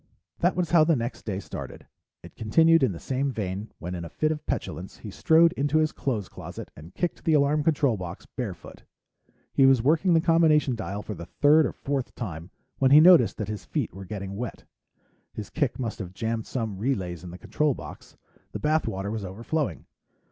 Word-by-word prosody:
That 175 +2 +2
was 180 -3 -1
how 170 -3 +6
the 160 0 +3
next 120 0 -4
day 100 -3 -3
started. - - -8 0.4
It - - -13
continued 165 +10 +4
in 130 -5 +3
the 85 - -7
same 135 +1 -1
vein 100 -2 -4
when, 90 +1 -6
in 85 -1 -5
a 85 - -7
fit 155 0 0
of 150 -1 -4
petulance, 90 +5 -4
he 105 - -9
strode 165 - +4
into 145 -1 0
his 155 -1 +2
clothes 110 -8 -3
closet - - -9
and 80 +4 -13
kicked 175 - -2
the 160 - +3
alarm 145 +1 +3
control 145 -7 +2
box, 90 -1 -7
barefoot. 105 -10 -7 0.7
He 135 - +5
was 130 -4 +4
working 165 +5 +3
the - - +5
combination 160 -5 +3
dial 105 -2 -5
for 105 - -5
the 85 -2 -9
third 150 - +4
or - - -5
fourth 135 -2 -4
time 85 -7 -6 0.3
when 135 - +4
he 145 +3 +9
noticed 175 +1 +6
that 105 - -3
his 105 0 -5
feet - - -3
were 95 +1 -9
getting 100 0 -6
wet. 120 +3 -6 0.7
His 105 - -7
kick 145 -6 -1
must 120 -4 -4
have 95 -2 -7
jammed 115 +1 -2
some 110 -6 -3
relays 95 - -2
in 90 - -8
the 90 - -9
control 150 +7 0
box; - - -11 0.4
the - - -4
bath 155 +1 +1
water 95 +2 -3
was 110 -2 -4
overflowing. 115 - -3
125 Hz, 205 wpm, -26 LUFS, 100-155 Hz, 0.7 s, he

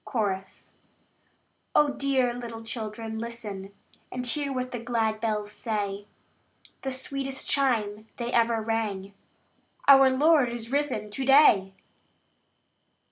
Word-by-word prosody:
Chorus. 195 -5 -3 1.0
Oh, 295 -1 +5
dear 265 -3 +1
little 230 -2 -7
children, 220 -1 -5
listen, 215 -4 -6 0.4
And 250 0 -4
hear 280 +3 0
what 255 -1 -3
the 245 - -4
glad 225 -2 -1
bells 210 -2 -1
say! 205 -3 -3 0.7
The 265 - -3
sweetest 270 +1 -3
chime 220 -6 0
they 240 0 -4
ever 230 -1 +2
rang 210 -3 -2 0.7
"Our 270 -1 +8
Lord 285 0 +4
is 235 0 -5
risen 270 -7 -1
to 265 +6 -3
day!" 235 -9 +5
235 Hz, 115 wpm, -27 LUFS, 215-265 Hz, 1.0 s, Our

